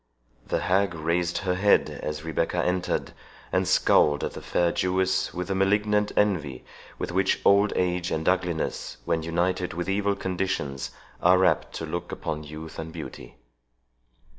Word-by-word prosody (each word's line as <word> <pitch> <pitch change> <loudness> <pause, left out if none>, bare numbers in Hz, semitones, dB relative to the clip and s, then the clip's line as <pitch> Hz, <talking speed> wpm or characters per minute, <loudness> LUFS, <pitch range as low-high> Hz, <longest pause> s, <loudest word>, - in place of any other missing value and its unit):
The - - 0
hag 95 0 +1
raised 85 +2 0
her 90 -2 0
head 100 +3 +3
as 75 0 -4
Rebecca 80 +2 -1
entered, 90 0 -1 0.4
and - - +1
scowled 75 -2 +4
at - - -3
the - - -8
fair 85 -1 +1
Jewess 95 +1 +1
with 90 0 -4
the - - +1
malignant 105 +2 +2
envy 75 -11 0 0.3
with - - -4
which 95 +2 +2
old 100 +1 +5
age 90 -1 0
and 80 0 -2
ugliness, 90 -3 -1
when 85 -1 0
united 90 +2 -1
with 85 +1 -3
evil 100 +1 +1
conditions, 90 -8 -2 0.3
are 90 +1 +5
apt - - +1
to - - -4
look - - -5
upon 75 0 -4
youth 80 +2 -9
and 80 0 -5
beauty. 70 -7 -9
90 Hz, 155 wpm, -26 LUFS, 80-95 Hz, 0.4 s, old